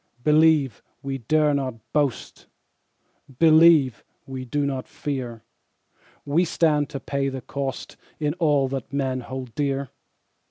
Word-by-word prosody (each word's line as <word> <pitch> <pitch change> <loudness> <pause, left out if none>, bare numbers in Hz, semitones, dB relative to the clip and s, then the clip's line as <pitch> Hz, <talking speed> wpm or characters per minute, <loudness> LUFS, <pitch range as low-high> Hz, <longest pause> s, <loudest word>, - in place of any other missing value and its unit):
Believe, 150 -5 +3 0.2
we 135 -1 -3
dare 150 +5 +2
not 135 -4 -2 0.2
boast, 145 -5 -2 0.9
Believe, 160 -5 +5 0.2
we 130 -1 -6
do 145 +3 -1
not 135 -2 -3
fear 125 -6 -5 0.8
We 150 +5 +2
stand 155 -4 +1
to 140 - -5
pay 140 0 -2
the 130 -1 -6
cost 135 +2 -5 0.2
In 150 -1 0
all 145 -5 +3
that 135 -2 -5
men 135 -2 -1
hold 130 -1 -7
dear. 140 -2 -2
140 Hz, 125 wpm, -24 LUFS, 130-150 Hz, 0.9 s, Believe